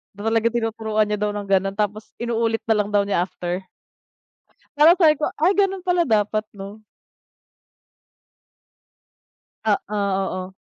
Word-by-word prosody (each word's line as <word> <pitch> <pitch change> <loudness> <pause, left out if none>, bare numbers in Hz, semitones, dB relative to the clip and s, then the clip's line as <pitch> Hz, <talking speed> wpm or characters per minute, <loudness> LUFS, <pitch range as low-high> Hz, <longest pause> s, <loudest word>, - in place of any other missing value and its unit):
na 205 - -10
talaga 225 0 +2
tinuturuan 220 -2 -1
niya 210 0 -3
daw 210 - +1
ng 205 -1 -4
ganon 195 0 +1
tapos 210 0 -3
inuulit 230 -1 -1
na 225 - +2
lang 205 - -5
daw 205 -1 +2
niya 200 -3 0
after. 180 +1 -4 1.2
Parang 320 +4 +7
sabi 315 -5 +5
ko, - - 0
"Ay 335 +5 +3
ganun 390 -2 +1
pala 355 -4 +1
dapat, 215 0 +1
'no." 200 +2 -9 2.8
Oo, 210 0 0 0.2
oo. 185 0 -4
215 Hz, 135 wpm, -22 LUFS, 205-235 Hz, 2.8 s, Parang